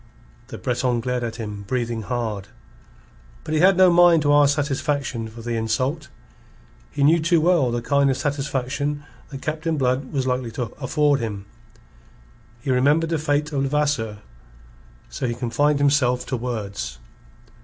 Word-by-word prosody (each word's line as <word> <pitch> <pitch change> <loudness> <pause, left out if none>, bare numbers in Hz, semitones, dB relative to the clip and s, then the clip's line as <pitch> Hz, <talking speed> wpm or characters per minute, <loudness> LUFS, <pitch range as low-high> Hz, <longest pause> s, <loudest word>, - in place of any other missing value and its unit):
The - - -8
Breton 125 -1 0
glared 125 +1 -2
at 115 -1 -4
him, 105 -3 -6
breathing 120 -1 -2
hard. 110 -4 -3 1.0
But 155 - -4
he 155 - +2
had 185 +2 +5
no 185 -1 +6
mind 170 -2 +5
to 145 0 +3
ask 145 -1 +5
satisfaction 140 -4 -2
for 115 +1 -11
the 120 0 -3
insult. 130 +7 -1 0.8
He 145 - -2
knew 160 +4 +5
too 170 +1 +3
well 165 -5 +3
the 120 0 -2
kind 140 +2 +2
of 135 - 0
satisfaction 145 0 -2 0.3
that 135 -2 -8
Captain 155 +1 -2
Blood 130 0 0
was 135 -3 -1
likely 125 -2 -1
to 120 -1 -4
afford 145 +1 +2
him. 105 -4 -5 1.2
He 135 - -2
remembered 145 +6 +2
the 165 - +1
fate 145 0 0
of 140 -2 -1
Levasseur. 135 -6 0 0.9
So 130 - -3
he 120 - -2
confined 125 +5 +1
himself 140 -3 +2
to 130 - -2
words. 105 - -4
135 Hz, 155 wpm, -22 LUFS, 120-150 Hz, 1.2 s, no